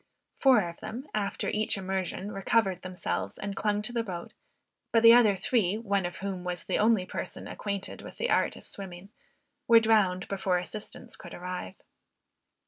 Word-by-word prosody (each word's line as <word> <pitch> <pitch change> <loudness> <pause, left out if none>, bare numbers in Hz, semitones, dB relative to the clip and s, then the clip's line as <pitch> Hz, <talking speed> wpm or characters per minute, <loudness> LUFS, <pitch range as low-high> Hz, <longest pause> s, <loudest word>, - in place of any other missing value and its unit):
Four 250 -9 +5
of 170 - -9
them, 255 +6 -6
after 205 -2 -1
each 215 -1 +1
immersion, 190 +1 -3
recovered 195 -2 +1
themselves 100 - -3
and 200 -1 -4
clung 210 0 0
to 240 - -2
the 235 - +1
boat; 180 -6 -6 0.6
but 230 -1 +4
the 230 0 +10
other 225 -4 +6
three, 200 -1 +1
one 200 -5 0
of 175 - -8
whom 190 -2 -4
was 180 -1 -3
the - - -1
only 215 -3 +3
person - - -5
acquainted 200 -2 -4
with - - -11
the 485 - -1
art - - +2
of - - -12
swimming, 190 -1 -6 0.6
were 230 -1 +8
drowned 210 -5 +2
before 190 -2 0
assistance 215 +6 -4
could 170 - -10
arrive. 180 - -5
195 Hz, 170 wpm, -29 LUFS, 180-220 Hz, 0.6 s, the